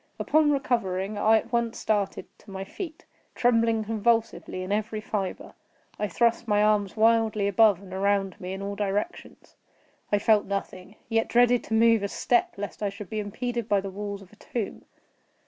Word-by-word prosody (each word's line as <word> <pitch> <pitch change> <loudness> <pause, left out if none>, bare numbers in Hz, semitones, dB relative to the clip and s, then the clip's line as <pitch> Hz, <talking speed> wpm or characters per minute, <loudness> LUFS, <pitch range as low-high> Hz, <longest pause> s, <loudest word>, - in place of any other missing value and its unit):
Upon 310 -1 +3
recovering, 215 -8 0
I 220 +2 +5
at - - -5
once 235 -1 0
started 205 -3 -1
to - - -18
my 190 0 -5
feet, 320 - -8 0.3
trembling 230 -2 +2
convulsively 225 -3 0
in 185 - -5
every 215 +1 -1
fibre. 210 -3 -4 0.5
I 210 - 0
thrust 235 +3 +1
my 210 -1 +3
arms 210 -1 +1
wildly 220 -2 +3
above 200 -1 +4
and 185 -1 -11
around 195 0 0
me 185 +1 -5
in 195 +1 -6
all 200 0 -4
directions. 205 - -4 0.5
I 205 - +4
felt 210 0 +3
nothing; 195 0 -5
yet 225 -1 +1
dreaded 245 0 +4
to 220 - -1
move 230 -1 +5
a 200 - -1
step, 240 +4 +1
lest 205 +1 -6
I 205 - 0
should 200 -1 -10
be 215 - -2
impeded 235 +2 -4
by 205 - +4
the 195 0 -5
walls 200 0 -6
of 190 - -19
a - - -19
tomb. 225 -3 -5
210 Hz, 180 wpm, -26 LUFS, 200-230 Hz, 0.5 s, I